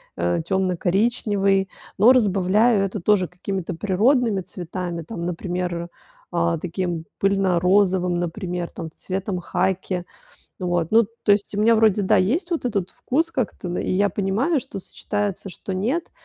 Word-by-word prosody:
э, 85 - 0
темно-коричневый. 195 +1 +1 0.3
Но 225 +6 +7
разбавляю 205 -1 +3
это 195 0 -4
тоже 190 -1 +3
какими-то 185 0 -4
природными 210 - +2
цветами, 175 -1 -5
там, 170 +3 -7
например, 175 0 -3 0.4
а, 170 -1 +1
таким 170 0 -3
пыльно-розовым, 185 -1 +2
например, 175 0 -3
там, 165 -3 -7
цветом 190 0 -3
хаки. 185 0 -1 0.6
Вот, 175 -2 -1
ну, 225 0 +6 0.2
то 205 - +4
есть, 200 0 +1
у - - -1
меня 230 +1 +5
вроде, 215 -2 +4
да, 190 - +3
есть 315 - +1
вот 330 -6 -1
этот 200 -6 -1
вкус 325 +6 -1
как-то, 215 -7 -3
да, 175 - -2
и - - -2
я 200 +2 +2
понимаю, 210 - 0
что 245 -7 -8
сочетается, 200 +1 -3
что 185 +2 -6
нет, 250 - -1
190 Hz, 145 wpm, -23 LUFS, 180-210 Hz, 0.6 s, Но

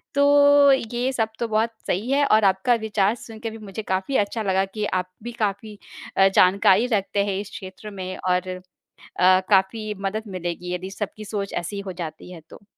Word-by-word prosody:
तो 285 0 +6 0.2
ये 245 +2 0
सब 225 -3 0
तो 235 - -1
बहुत 220 +1 +1 0.2
सही 205 +7 -1
है 285 +1 +3
और 215 -5 +4
आपका 190 +5 +3
विचार 210 -1 +1
सुन 225 -2 -11
के 225 0 -4
भी 225 - -9
मुझे 215 0 -7
काफ़ी 190 +7 -2
अच्छा 205 +2 -1
लगा 190 -1 +2
कि 210 +2 -4
आप 185 -2 -2
भी 240 - -5
काफ़ी 210 0 -2 0.4
अ, 195 - +6
जानकारी 195 +4 +5
रखते 200 0 0
हैं 195 -1 -2
इस 205 - -9
क्षेत्र 200 +1 -9
में 185 0 -4
और 180 0 0
अ, - - -14 0.9
काफ़ी 210 +2 +2
मदद 205 +3 -2
मिलेगी 180 -1 -5
यदि 180 +1 -4
सबकी 210 +1 -6
सोच 200 -1 -4
ऐसी 190 +4 -4
हो - - -3
जाती 165 0 -7
है 170 -3 -10
तो। - - -14
205 Hz, 195 wpm, -23 LUFS, 190-220 Hz, 0.9 s, तो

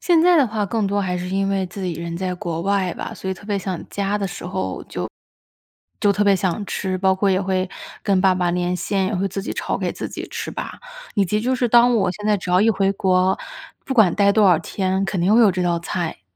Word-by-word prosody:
现 345 -3 +4
在 350 +1 +5
的 280 - +5
话 210 -2 -2
更 215 0 -1
多 205 +1 0
还 180 -2 -1
是 180 0 -4
因 195 +1 0
为 195 -1 0
自 190 +2 -8
己 180 -2 -2
人 170 +1 -5
在 185 0 -2
国 170 -2 -4
外 195 -2 +1
吧， - - -6
所 190 - -5
以 - - -2
特 200 - -15
别 205 -2 0
想 185 -3 -5
家 200 +1 -1
的 200 - -1
时 180 0 -8
候 185 +1 -3
就 - - -5 0.9
就 205 -1 +4
特 205 +1 +1
别 200 - +5
想 190 +1 -1
吃。 190 -2 -2
包 190 0 +3
括 195 +1 +1
也 185 - +2
会 190 -1 -1 0.3
跟 195 -3 +2
爸 190 -1 +4
爸 180 -1 0
连 180 0 0
线， 190 +1 -1
也 210 - -2
会 195 +2 0
自 195 +1 -4
己 - - -4
炒 - - -2
给 - - -2
自 - - -5
己 - - -6
吃 - - -5
吧， - - -6 0.4
以 200 -2 +3
及 210 +4 0
就 255 +3 0
是 245 -1 0
当 240 +1 +5
我 195 - +2
现 210 +2 -6
在 210 -1 +3
只 180 - -5
要 180 +1 +4
一 225 - +4
回 195 -2 +1
国， 185 -1 +2 0.5
不 265 - -3
管 215 -8 +5
待 200 -1 +4
多 215 0 +4
少 180 -4 +5
天， 190 +3 -1
肯 180 0 -2
定 185 +4 +3
会 235 - +6
有 220 -4 +6
这 185 0 -2
道 170 -1 +1
菜。 170 - -4
195 Hz, 285 characters per minute, -21 LUFS, 180-205 Hz, 0.9 s, 会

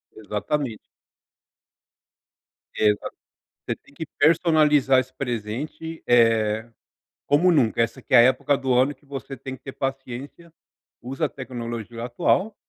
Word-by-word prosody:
Exatamente. 110 +4 -3 2.0
Exato, 105 -1 +1 0.5
você - - -2
tem 140 - -24
que 160 +3 -6
personalizar 150 -4 +4
esse 130 0 -8
presente, 130 +6 -5
eh, 115 -2 +3 0.6
como 170 +6 +4
nunca. 120 -8 +2
Essa 115 +3 -2
que - - -7
é - - +9
a - - +10
época 130 +3 +3
do 130 -2 0
ano 130 +4 +3
que 145 - -28
você 135 -1 -7
tem 130 -1 -7
que - - -22
ter 135 - -7
paciência, 135 +4 -6 0.5
usa 135 +6 -2
a - - -2
tecnologia 120 -3 -6
atual 185 - +1
130 Hz, 130 wpm, -24 LUFS, 115-145 Hz, 2.0 s, a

